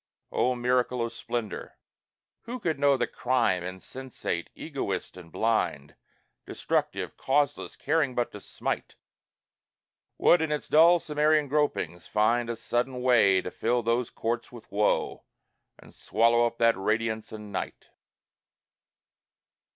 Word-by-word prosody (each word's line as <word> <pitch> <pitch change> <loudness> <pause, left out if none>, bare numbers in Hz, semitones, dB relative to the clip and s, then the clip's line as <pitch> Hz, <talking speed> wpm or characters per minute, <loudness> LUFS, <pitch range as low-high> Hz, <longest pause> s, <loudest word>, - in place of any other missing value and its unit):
O 125 +1 +1
miracle 125 0 +1
of 115 - -6
splendor! 115 -2 -5 0.7
Who 245 +2 -5
could 160 - -1
know 140 -1 +4
That - - -2
Crime, 120 -8 +1
insensate, 95 0 -5
egoist 130 - -4
and 90 -3 -12
blind, 75 -11 -1 0.5
Destructive, - - -2
causeless, 145 +1 0
caring 145 -4 0
but 120 - 0
to 105 - -9
smite, - - -4 1.2
Would 175 - +5
in 160 -1 -1
its 150 - -2
dull 170 +3 +6
Cimmerian 150 -1 +2
gropings 110 - -1
find 115 +3 +2
A 115 - -2
sudden 125 +2 -2
way 100 -7 +5
to 90 - -5
fill 120 +1 0
those 115 +1 0
courts 120 +1 -3
with 120 -2 -13
woe, 105 +1 0 0.5
And - - -17
swallow 115 +2 +3
up 115 0 -7
that 115 0 +4
radiance 110 +2 -1
in 105 -1 -8
night? 95 - -5
120 Hz, 130 wpm, -27 LUFS, 110-135 Hz, 1.2 s, dull